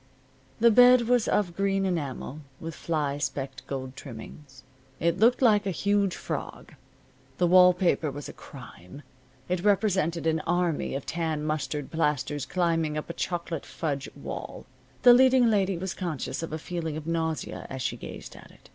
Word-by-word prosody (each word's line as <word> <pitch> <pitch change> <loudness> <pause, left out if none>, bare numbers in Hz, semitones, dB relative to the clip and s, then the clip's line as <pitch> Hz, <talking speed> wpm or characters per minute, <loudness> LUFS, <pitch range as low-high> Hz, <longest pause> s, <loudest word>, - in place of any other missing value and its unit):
The 235 +1 +6
bed 250 +2 +7
was 240 -1 +2
of 180 -5 0
green 195 0 +1
enamel, 150 -5 -3 0.2
with 165 0 -6
fly 150 -4 -2
specked 135 -1 -4
gold 130 -1 -5
trimmings. 130 +1 -11 0.4
It 170 +2 +1
looked 240 +4 +4
like 210 -4 +4
a - - +1
huge 200 +1 +1
frog. - - -6 0.6
The 180 - +2
wall 180 +1 +7
paper 175 -3 +1
was 145 +1 -7
a - - -9
crime. 125 - -12 0.4
It 180 0 -1
represented 190 -5 +1
an 160 0 +2
army 175 -3 -1
of 135 - -4
tan 160 -2 -2
mustard 150 -2 -3
plasters 150 -3 -1
climbing 165 -3 0
up 150 - -4
a - - -8
chocolate 170 -3 -4
fudge 140 -4 -3
wall. - - -7 0.4
The 245 - +9
leading 255 -1 +5
lady 195 -3 +1
was 190 +1 -4
conscious 170 -6 -4
of 165 - -5
a 155 - -2
feeling 160 -1 -4
of 155 - -7
nausea 160 -1 -3
as 130 -1 -5
she - - -1
gazed - - -9
at - - -14
it. - - -20
165 Hz, 165 wpm, -27 LUFS, 150-190 Hz, 0.6 s, The